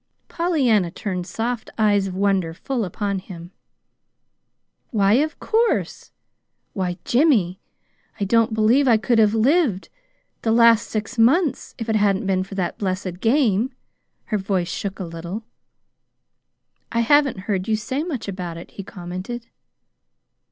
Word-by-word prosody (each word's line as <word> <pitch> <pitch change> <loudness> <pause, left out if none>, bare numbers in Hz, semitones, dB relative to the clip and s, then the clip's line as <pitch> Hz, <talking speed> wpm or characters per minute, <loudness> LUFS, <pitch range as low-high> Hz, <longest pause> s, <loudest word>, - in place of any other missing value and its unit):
Pollyanna 260 - +2
turned 180 0 -4
soft 230 +4 -3
eyes 205 -3 +3
of 185 - -6
wonder 190 -4 +1
full 245 +3 -2
upon 200 +2 -2
him. 175 -2 -10 1.4
"Why, 200 -2 +3
of 300 +6 +1
course! 455 +1 0 0.6
Why, 180 -3 -2
Jimmy, 235 - +2 0.6
I - - 0
don't 230 +2 +3
believe 235 +6 +3
I 230 -3 +6
could 225 +1 +1
have 215 0 +4
lived 240 - +2 0.5
the 225 - 0
last 230 -1 +5
six 220 +3 -4
months 285 +7 +2
if 230 - -5
it 220 -1 +2
hadn't 200 -1 +1
been 190 -1 +1
for 195 +1 -9
that 185 -3 -2
blessed 185 -2 -3
game." 240 0 +2 0.5
Her 215 - -1
voice 190 -2 -1
shook 200 -1 -4
a 190 - -3
little. 170 +6 -6 1.5
"I 230 - +1
haven't 280 -4 +3
heard 190 -2 -2
you 220 - +2
say 235 +6 -3
much 300 -11 -4
about 180 -4 -5
it," 170 - -10
he 195 - -8
commented. 185 +7 -7
210 Hz, 140 wpm, -22 LUFS, 190-240 Hz, 1.5 s, I